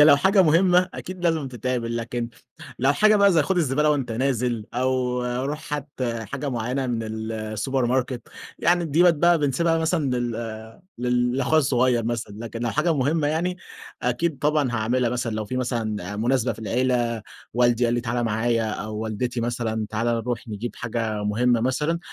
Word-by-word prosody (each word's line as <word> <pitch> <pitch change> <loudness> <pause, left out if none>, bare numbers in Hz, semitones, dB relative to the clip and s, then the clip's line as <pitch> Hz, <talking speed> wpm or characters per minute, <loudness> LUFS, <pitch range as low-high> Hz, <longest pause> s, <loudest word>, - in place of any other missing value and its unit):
هي - - +10
لو 150 -2 +8
حاجة 190 +6 +4
مهمّة 180 +2 +4
أكيد 185 -1 -7
لازم 160 -5 +1
تتعمل، 120 -1 -2
لكن 120 0 -3 0.5
لو 135 +2 +3
حاجة 215 +8 +5
بقى 200 -1 +5
زي 160 -3 +4
خد 190 +5 -1
الزبالة 150 -1 +2
وأنت 135 -6 0
نازل، 125 -2 0
أو 125 0 0 0.2
روح 150 +2 -5
هات 145 0 -4
حاجة 120 +4 -3
معيّنة 125 +3 -2
من 120 -2 -1 0.3
السوبر 110 +4 -1
ماركت، 125 0 -1 0.4
يعني 175 +1 +2
ديّة 160 +2 +3
بقِت 175 -1 +6
بقى 170 +2 +4
بنسيبها 160 +3 +1
مثلًا 160 -3 0
لل 120 -1 -1 0.7
لل 125 0 +1
لأخويا 135 +4 +3
الصغيّر 125 -4 +2
مثلًا، 115 -2 -3
لكن 115 0 -6
لو 120 - 0
حاجة 155 +6 +1
مهمّة 145 +3 +1
يعني، 170 +4 0 0.5
أكيد 135 +5 0
طبعًا 150 -3 +1
هاعملها 120 +2 +1
مثلًا 120 -1 -2
لو 110 0 -2
في 125 +5 -4
مثلًا 110 -6 -2
مناسبة 125 +3 +1
في - - -13
العيلة، 120 +1 0 0.3
والدي 120 0 +3
قال 120 0 +2
لي 120 - 0
تعالى 120 +1 -1
معايا 115 0 0
أو 105 +1 -5
والدتي 110 +3 -2
مثلًا 115 -2 -2
تعالى 115 +2 0
نروح 115 0 -3
نجيب 110 +3 -5
حاجة 115 -2 -2
مهمّة 120 +3 +2
مثلًا، 150 +7 0
125 Hz, 175 wpm, -24 LUFS, 115-150 Hz, 0.7 s, هي